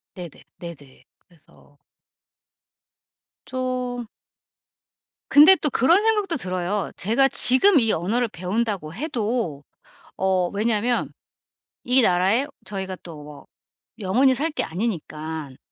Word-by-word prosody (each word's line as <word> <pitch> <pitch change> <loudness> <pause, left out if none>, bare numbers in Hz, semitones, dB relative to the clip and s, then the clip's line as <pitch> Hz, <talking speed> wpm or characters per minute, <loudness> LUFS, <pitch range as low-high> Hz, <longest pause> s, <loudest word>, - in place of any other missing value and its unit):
네네. 180 -2 -8 0.3
네네. 145 -7 -12 0.2
그래서 155 -4 -26 1.7
좀 255 -2 -4 1.2
근데 310 +7 +8
또 305 - -1
그런 325 - +3
생각도 420 -7 0
들어요. 185 -1 -3
제가 235 +8 +2
지금 280 +7 +5
이 225 -3 +2
언어를 220 +9 -1
배운다고 190 -3 -3
해도 225 - -3 0.5
어 185 -2 0
왜냐면 225 +3 -1 0.7
이 250 +1 +4
나라에 195 +7 +2 0.2
저희가 190 -1 -6
또 165 -4 -10
뭐 145 -1 -13 0.5
영원히 250 +7 +2
살 310 +6 -2
게 300 - -3
아니니깐 160 - -5
210 Hz, 210 characters per minute, -22 LUFS, 175-255 Hz, 1.7 s, 근데